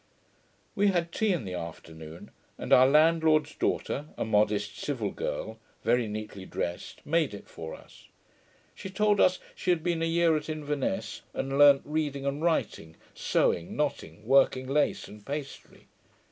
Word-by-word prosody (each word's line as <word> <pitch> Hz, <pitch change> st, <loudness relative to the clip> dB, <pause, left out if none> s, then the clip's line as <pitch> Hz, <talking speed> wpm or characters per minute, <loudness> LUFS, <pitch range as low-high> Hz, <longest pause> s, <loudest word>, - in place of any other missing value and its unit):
We 205 Hz, +1 st, +2 dB
had 175 Hz, -3 st, +1 dB
tea 220 Hz, +2 st, +1 dB
in 170 Hz, -, -1 dB
the 90 Hz, -, -5 dB
afternoon, 80 Hz, -1 st, -9 dB, 0.3 s
and -, -, -1 dB
our 130 Hz, +1 st, +8 dB
landlord's 155 Hz, 0 st, +4 dB
daughter, 145 Hz, +2 st, -2 dB
a -, -, -2 dB
modest 105 Hz, -1 st, +1 dB
civil 120 Hz, -9 st, -2 dB
girl, 110 Hz, 0 st, -4 dB, 0.2 s
very 120 Hz, 0 st, +2 dB
neatly 105 Hz, -2 st, -6 dB
drest, 85 Hz, -1 st, -5 dB
made 155 Hz, -7 st, +1 dB
it 100 Hz, -, -12 dB
for 80 Hz, -1 st, -8 dB
us. -, -, -17 dB, 0.7 s
She 190 Hz, -, -8 dB
told 210 Hz, +1 st, +2 dB
us, 185 Hz, 0 st, +4 dB, 0.2 s
she -, -, -4 dB
had 170 Hz, -3 st, +2 dB
been 170 Hz, -2 st, 0 dB
a -, -, +1 dB
year 165 Hz, -1 st, +3 dB
at 150 Hz, 0 st, -3 dB
Inverness, 150 Hz, +4 st, -3 dB
and 135 Hz, 0 st, -2 dB
learnt 140 Hz, -1 st, +7 dB
reading 145 Hz, -2 st, -2 dB
and 140 Hz, +2 st, -2 dB
writing, 160 Hz, -, -1 dB, 0.2 s
sewing, 85 Hz, 0 st, 0 dB
knotting, 110 Hz, -, -3 dB
working 130 Hz, 0 st, +4 dB
lace, 145 Hz, +2 st, 0 dB
and 105 Hz, 0 st, -13 dB
pastry. 140 Hz, +2 st, -7 dB
140 Hz, 155 wpm, -28 LUFS, 105-160 Hz, 0.7 s, our